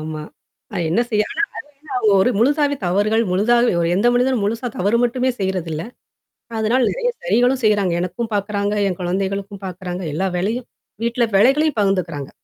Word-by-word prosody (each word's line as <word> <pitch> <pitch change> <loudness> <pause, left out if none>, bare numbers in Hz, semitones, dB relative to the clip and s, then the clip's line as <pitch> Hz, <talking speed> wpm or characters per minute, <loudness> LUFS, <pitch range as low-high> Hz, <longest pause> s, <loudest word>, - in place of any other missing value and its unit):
ஆமா. 155 0 -5 0.5
அ - - -2
என்ன 190 +8 +2
செய்யா. 210 -1 +2
ஆனா - - -1 0.5
அவங்க 245 -3 0
என்ன 200 - +5
ஒரு 250 - +3
முழுசாவே 285 +4 +2
தவறுகள், 205 +5 +2
முழுதாகவே 235 +5 +3
ஒரு 165 - +1
எந்த 205 +6 +3
மனிதனும் 250 -2 +2
முழுசா 230 +4 -1
தவறு 205 +5 +2
மட்டுமே 250 +2 +1
செய்றதில்ல. 180 -5 -2 0.8
அதனால 235 +3 +2
நெறைய - - -1
சரிகளும் 260 - +2
செய்றாங்க. 205 -4 +2
எனக்கும் 185 +6 -4
பாக்கறாங்க, 205 0 -1
என் 185 -3 -2
குழந்தைகளுக்கும் 195 +2 -3
பாக்கறாங்க. 180 0 -5
எல்லா 190 +6 0
வேலையும். 225 +7 -2 0.4
வீட்ல 235 +1 +1
வேலைகளையும் 270 +7 +4
பகிர்ந்துக்கிறாங்க. 180 -8 -1
205 Hz, 155 wpm, -20 LUFS, 185-245 Hz, 0.8 s, என்ன